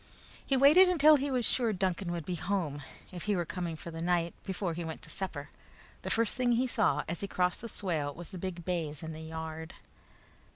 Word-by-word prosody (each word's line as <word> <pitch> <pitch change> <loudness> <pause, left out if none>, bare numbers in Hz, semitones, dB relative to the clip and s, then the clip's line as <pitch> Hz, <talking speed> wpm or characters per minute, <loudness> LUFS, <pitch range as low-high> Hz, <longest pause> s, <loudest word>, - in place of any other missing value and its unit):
He 270 - +1
waited 305 +8 +7
until 310 -3 +7
he 280 +1 -1
was 250 -3 0
sure 235 -3 +2
Duncan 185 -1 -1
would 170 -3 -4
be 180 - -3
at 170 - -4
home, 160 -8 -1 0.3
if 180 -2 -6
he 210 -1 +2
were 175 -2 0
coming 175 -1 -3
for 170 +2 -8
the 165 0 -6
night, 170 -1 +1
before 190 -2 -2
he 170 +1 -4
went 160 -1 -6
to - - -6
supper. 165 -7 -4 0.5
The - - -4
first 230 -1 +1
thing 250 -2 +2
he 245 +2 +2
saw 255 - +2
as 170 - -3
he 200 - -3
crossed 180 -2 0
the 230 - -6
swale 160 -9 -2
was 170 +4 -9
the 185 - -7
big 175 -2 -5
bays 165 -4 -2
in 160 0 -5
the 155 - -8
yard. 160 +1 -6
180 Hz, 225 wpm, -31 LUFS, 160-220 Hz, 0.5 s, waited